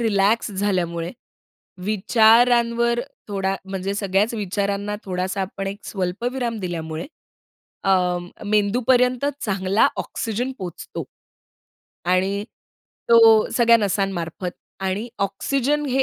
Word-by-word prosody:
relax 215 0 +2
झाल्यामुळे, 180 -4 -1 0.7
विचारांवर 235 +3 +4 0.3
थोडा 195 -1 -1
म्हणजे 195 0 -3
सगळ्याच 200 +3 +1
विचारांना 200 0 -2
थोडासा 185 +1 -2
आपण 195 +1 -5
एक 200 +1 -4
स्वल्पविराम 230 +5 -2
दिल्यामुळे 165 -1 -4 0.8
अं, 180 -2 +1 0.2
मेंदूपर्यंत 245 +5 +2 0.2
चांगला 195 0 +2
ऑक्सिजन 235 +3 -3
पोहोचतो 180 -3 -6 1.0
आणि 190 +3 +1 0.7
तो 225 -2 +7
सगळ्या 235 -1 +6
नसांमार्फत 190 -4 -2 0.3
आणि 195 +5 -2
ऑक्सिजन 275 +9 0
हे 265 0 +2
200 Hz, 90 wpm, -22 LUFS, 190-230 Hz, 1.0 s, तो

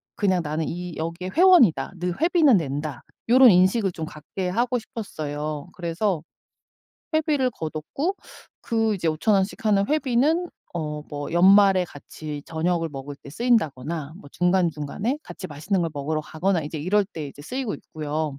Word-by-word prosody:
그냥 190 -4 +1
'나는 155 +2 -2
이 175 -1 -5
여기에 170 +3 -4
회원이다. 340 - +5
늘 180 +3 -3
회비는 325 - +5
낸다.' 145 -2 -2 0.3
요런 255 0 +8
인식을 190 +3 +3
좀 160 -2 -5
갖게 155 +5 -6
하고 240 +6 0
싶었어요. 155 -8 -5
그래서 175 -1 -1 0.9
회비를 295 -5 +2
거뒀고 190 - -3 0.4
그 225 -2 0
이제 170 -3 -3
5,000 160 +7 +2
원씩 195 +3 -1
하는 200 -2 +3
회비는 305 +4 +2 0.3
어 150 -2 -3
뭐 145 0 -5
연말에 190 +1 +6
같이 150 -1 -8
저녁을 165 +1 0
먹을 140 0 -7
때 140 - -13
쓰인다거나 160 - 0
뭐 145 - -13
중간중간에 180 - 0
같이 185 - -8
맛있는 175 +5 -2
걸 165 - -1
먹으러 150 +2 -2
가거나 175 +4 -1
이제 150 +2 -5
이럴 195 +7 +2
때 165 -6 -7
이제 140 - -13
쓰이고 250 - -3
있고요. 150 -2 -4
180 Hz, 325 characters per minute, -24 LUFS, 155-220 Hz, 0.9 s, 요런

